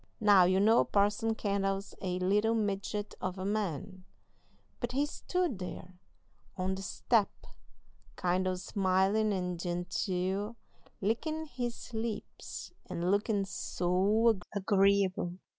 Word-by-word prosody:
Now, 205 -4 +7
you 185 +1 +3
know 220 +4 +5
Parson 205 +2 +1
Kendall's 195 -1 -1
a 180 -2 -1
little 205 +5 +2
midget 205 -1 -2
of 185 +1 -3
a 185 - -4
man, 195 -2 -2 0.8
but 240 0 -3
he 280 +3 +2
stood 340 - -2
there 180 0 -7 0.6
on 185 +1 0
the 190 - -5
step 215 +2 +1 0.9
kind 180 +1 +1
o' 185 - 0
smilin' 195 +3 +1
and 180 -3 -2
genteel, 185 +4 -2 0.5
lickin' 310 +10 -1
his 245 -3 -5
lips 220 -1 -5 0.2
and 175 +2 -1
lookin' 205 0 +1
so 195 +5 +2 0.2
agreeable! 195 -2 +2
200 Hz, 115 wpm, -31 LUFS, 185-220 Hz, 0.9 s, Now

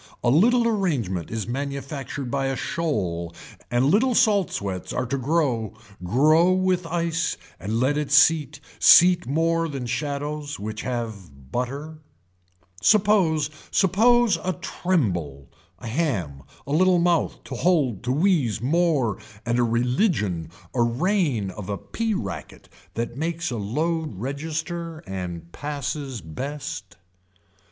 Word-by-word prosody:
A 120 - +3
little 235 - +4
arrangement 140 - -1
is 110 -3 -3
manufactured 140 0 -4
by 135 -1 0
a 135 - -1
shoal 90 - -2 0.3
and 120 +2 +2
little 230 - +3
salt 210 -6 +4
sweats 95 -2 -4
are 125 - -1
to 130 - -2
grow 130 -6 0 0.3
grow 155 - +4
with 185 -2 +1
ice 165 -1 -1 0.2
and 105 +5 -2
let 140 +4 +2
it 150 -2 -3
seat 145 -1 +4 0.2
seat 175 0 +7
more 165 +3 +1
than 135 -4 -4
shadows 145 +3 -3
which 110 +1 -5
have 100 - -6
butter. 140 +6 -4 0.8
Suppose, 190 -8 +3 0.2
suppose 230 +4 +4
a 185 - 0
tremble, 95 - -2 0.3
a 95 - -12
ham, 105 - -2 0.2
a 140 - -6
little 180 +4 +4
mouth 170 -1 +1
told 150 - +1
to 125 - -1
wheeze 150 - +2
more 145 - +1 0.3
and 120 +1 +1
a - - +4
religion 115 - 0 0.2
a 125 - +1
reign 125 - +1
of 95 +1 -8
a 100 - -2
pea 225 - -2
racket 95 - -6 0.3
that 120 +1 -3
makes 165 0 -2
a 120 - -2
load 155 - -2
register 160 - -4
and 90 -3 -6
passes 140 - -4
best. 95 - -6
140 Hz, 130 wpm, -24 LUFS, 115-170 Hz, 0.8 s, seat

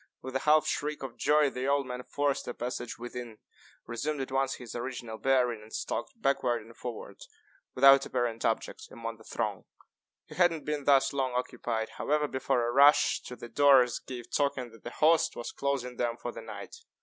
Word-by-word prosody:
With 130 0 -7
a - - +2
half 155 +2 +4
shriek 150 -1 -2
of 135 - -6
joy 150 -1 +3
the 130 +1 -3
old 140 0 +2
man 125 0 -5
forced 145 +2 -1
a 120 - -4
passage 120 0 -4
within, 120 -2 -7 0.5
resumed 140 +6 -3
at 135 0 -4
once 135 0 +1
his 125 -3 -9
original 120 -2 -5
bearing, 125 -4 +2
and 110 +1 -15
stalked 240 - -4
backward 125 - +1
and 115 +1 -15
forward, 120 -3 -7 0.6
without 135 +1 +7
apparent 120 -3 -2
object, 115 - -2
among 115 0 -6
the 110 - -16
throng. - - -3 0.6
He - - -12
had 175 +2 +5
not 160 -2 -6
been 150 -2 -2
thus 140 -1 +4
long 130 -2 -1
occupied, 120 -2 -2
however, 150 0 +1
before 125 -3 0
a - - 0
rush 140 +3 +5
to 125 - -7
the 120 - -9
doors 130 -3 +5
gave 120 -2 -9
token 135 -4 0
that 115 -2 -17
the - - -5
host 160 +5 +3
was 120 - -5
closing 130 -3 -2
them 120 -1 -1
for - - -5
the - - -9
night. 470 - -9
130 Hz, 195 wpm, -29 LUFS, 120-140 Hz, 0.6 s, without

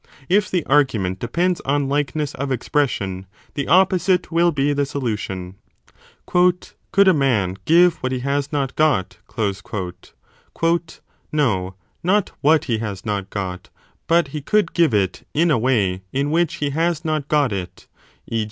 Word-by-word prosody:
If 205 +3 +3
the 180 -4 -1
argument 105 -11 +1
depends 170 - 0
on 140 0 0
likeness 145 +1 -1
of 140 0 -4
expression, 105 -8 -1 0.3
the 140 - -3
opposite 185 0 +3
will 170 +1 +3
be 145 -1 +1
the 145 0 +1
solution. 105 -9 -4 0.7
Could 180 0 +2 0.4
a 190 - +7
man 110 - +1
give 175 +1 +5
what 130 - -2
he 130 -1 -2
has 140 +1 -1
not 140 -3 -2
got? 150 -12 +1 2.1
No, 95 -11 0 0.3
not 190 +3 +1
what 155 +2 +4
he 115 -5 0
has 105 -3 -5
not 100 -2 -2
got; 90 -3 -5 0.4
but 170 -3 +3
he 150 +1 -5
could 210 +4 +1
give 160 -9 +3
it 95 -3 -1
in 165 +2 +3
a 130 - +3
way 105 -7 +1
in 140 +2 -1
which 170 0 +1
he 145 -1 -2
has 165 +2 -1
not 155 -3 -1
got 145 -7 +2
it, 90 -2 -6 0.4
e. 115 - -2
140 Hz, 150 wpm, -21 LUFS, 105-165 Hz, 2.1 s, a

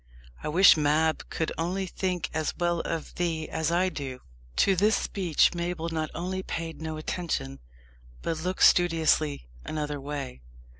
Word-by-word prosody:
I - - -4
wish 185 +5 +7
Mab 155 +1 +1
could 160 - -2
only 185 +4 -1
think 180 -1 -2
as 155 -1 -1
well 175 -1 +1
of 165 -1 -4
thee 165 -3 -1
as 160 -1 -1
I 180 +2 +2
do." 135 -6 -6 0.3
To 195 - +4
this 210 +4 +3
speech 180 -6 +2
Mabel 170 -1 -3
not 160 -1 -2
only 185 +3 -3
paid 165 -3 -5
no 160 -1 -4
attention, 155 -4 -3 0.6
but 160 - -2
looked 180 +3 -1
studiously 160 - +3 0.2
another 150 -2 -3
way. 140 - -5
165 Hz, 150 wpm, -27 LUFS, 155-175 Hz, 0.6 s, wish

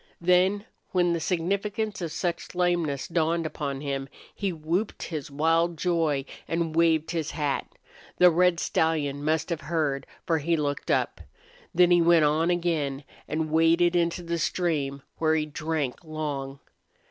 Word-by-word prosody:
Then, 185 +4 +3 0.3
when 175 -2 +3
the 170 - 0
significance 200 +5 -1
of 165 -3 -3
such 170 +1 -3
lameness 175 -6 0
dawned 165 0 0
upon 140 -3 -4
him 135 -2 -3 0.2
he 200 -2 -2
whooped 170 +6 -2
his 155 -5 -5
wild 165 +3 +1
joy 160 -6 +1 0.2
and 165 -1 -1
waved 165 -1 +3
his 160 -3 -2
hat. 145 -3 -2 0.5
The 180 0 +7
red 175 0 +3
stallion 145 -4 0
must 160 +2 0
have 165 - -2
heard, 145 -2 -1 0.2
for 165 -3 +1
he 165 +3 +1
looked 145 -2 -2
up. - - 0 0.5
Then 180 -1 +4
he 175 -1 +6
went 165 -2 +5
on 155 +3 +2
again 160 -6 0 0.2
and 155 0 -2
waded 165 +2 +4
into 170 0 +1
the 170 0 -2
stream, 145 -6 -1 0.2
where 160 -1 +3
he 155 -1 +1
drank 155 -2 -3
long. 145 -4 -4
165 Hz, 150 wpm, -26 LUFS, 150-175 Hz, 0.5 s, The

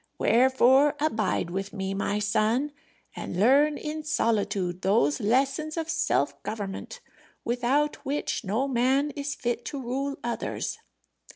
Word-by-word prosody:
Wherefore 260 +3 +4
abide 220 - 0
with 195 +2 -4
me, 195 -2 -3
my 200 +1 -1
son, 215 +7 +1 0.4
and 180 - -5
learn 285 +7 +4
in 310 +1 -4
solitude 200 - 0
those 190 -7 +2
lessons 270 +8 +1
of 325 0 -2
self 330 - 0
government 200 -3 -6 0.4
without 250 +5 +1
which 285 -2 -3
no 220 +7 0
man 265 +3 +2
is 285 -1 -4
fit 240 -1 -2
to 285 - -4
rule 270 +3 -2
others." 235 0 -3
245 Hz, 125 wpm, -27 LUFS, 210-285 Hz, 0.4 s, Wherefore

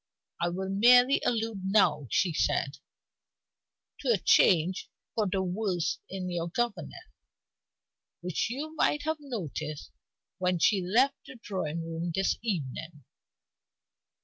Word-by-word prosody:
"I 175 - +2
will 190 +2 -4
merely 245 +7 +5
allude 225 -3 -1
now," 190 -8 +2
she 175 - +1
said, 140 -1 0 1.2
"to - - -3
a - - +4
change 180 0 +3 0.2
for 215 -2 0
the 190 -1 0
worse 185 -2 -1
in 185 -1 -4
your 170 -1 -2
governess, 205 -5 -3 1.2
which 180 +4 -1
you 295 +6 -5
might 295 -1 +1
have 315 +1 -1
noticed 160 - -6 0.5
when 180 -1 +1
she 195 +4 +3
left 245 +10 +2
the - - -10
drawing 170 -7 -3
room 165 +1 -4
this 195 0 +1
evening. 160 - -4
190 Hz, 120 wpm, -29 LUFS, 170-230 Hz, 1.2 s, merely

